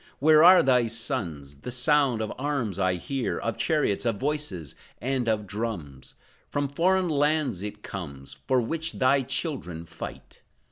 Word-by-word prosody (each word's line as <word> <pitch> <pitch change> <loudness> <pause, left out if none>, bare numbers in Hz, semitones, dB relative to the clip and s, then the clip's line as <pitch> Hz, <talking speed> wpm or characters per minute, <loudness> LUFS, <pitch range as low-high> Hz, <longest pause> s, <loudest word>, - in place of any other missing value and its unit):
Where 155 +2 +6
are 180 +1 +8
thy 125 -3 +3
sons? 95 - -4
The 125 - -8
sound 130 -2 +2
of 110 - -4
arms 130 -9 -2
I 95 -1 +2
hear, 130 +8 -3
Of 115 - -2
chariots, 150 - +1
of 115 -4 0
voices, 135 - -3 0.3
and 130 -2 -1
of 105 -1 0
drums; 95 - -5 0.3
From 145 -1 -1
foreign 185 +5 +2
lands 145 - +1
it 105 0 -7
comes, 70 -9 -7
For 130 - +3
which 160 +7 -2
thy 135 +1 +3
children 125 - -3
fight. - - -9
125 Hz, 150 wpm, -26 LUFS, 100-145 Hz, 0.3 s, are